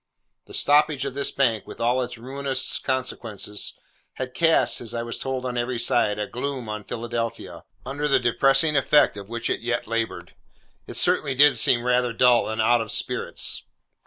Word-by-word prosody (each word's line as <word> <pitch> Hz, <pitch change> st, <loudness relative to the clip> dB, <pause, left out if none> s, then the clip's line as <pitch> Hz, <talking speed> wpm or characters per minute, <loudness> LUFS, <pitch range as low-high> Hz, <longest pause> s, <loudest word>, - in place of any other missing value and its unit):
The -, -, -7 dB
stoppage 145 Hz, -1 st, +3 dB
of 135 Hz, -, -4 dB
this 140 Hz, 0 st, 0 dB
bank, 115 Hz, -6 st, 0 dB
with -, -, -10 dB
all 120 Hz, +2 st, +1 dB
its 125 Hz, -1 st, -5 dB
ruinous 135 Hz, +2 st, -2 dB
consequences, 115 Hz, -6 st, -3 dB, 0.4 s
had 130 Hz, -1 st, -6 dB
cast 165 Hz, +2 st, +2 dB
(as 120 Hz, 0 st, -5 dB
I 115 Hz, -, -2 dB
was 115 Hz, 0 st, -5 dB
told 130 Hz, -1 st, -4 dB
on 125 Hz, -1 st, -2 dB
every 120 Hz, +1 st, -2 dB
side) 110 Hz, -3 st, +1 dB
a 105 Hz, -, -2 dB
gloom 130 Hz, +1 st, -5 dB
on 105 Hz, -1 st, -6 dB
Philadelphia, 115 Hz, 0 st, -5 dB, 0.2 s
under 145 Hz, +2 st, -3 dB
the 135 Hz, -2 st, +4 dB
depressing 135 Hz, +5 st, +2 dB
effect 145 Hz, -1 st, +4 dB
of 100 Hz, 0 st, -9 dB
which 115 Hz, 0 st, -3 dB
it -, -, -1 dB
yet 120 Hz, 0 st, -2 dB
laboured. 115 Hz, 0 st, -3 dB, 0.5 s
It -, -, -3 dB
certainly 140 Hz, -2 st, +3 dB
did 145 Hz, 0 st, +6 dB
seem 120 Hz, +1 st, +4 dB
rather 125 Hz, -1 st, +1 dB
dull 120 Hz, -1 st, +3 dB
and 110 Hz, 0 st, -4 dB
out 115 Hz, +2 st, +3 dB
of 110 Hz, -, -5 dB
spirits. -, -, -2 dB
125 Hz, 180 wpm, -24 LUFS, 115-135 Hz, 0.5 s, did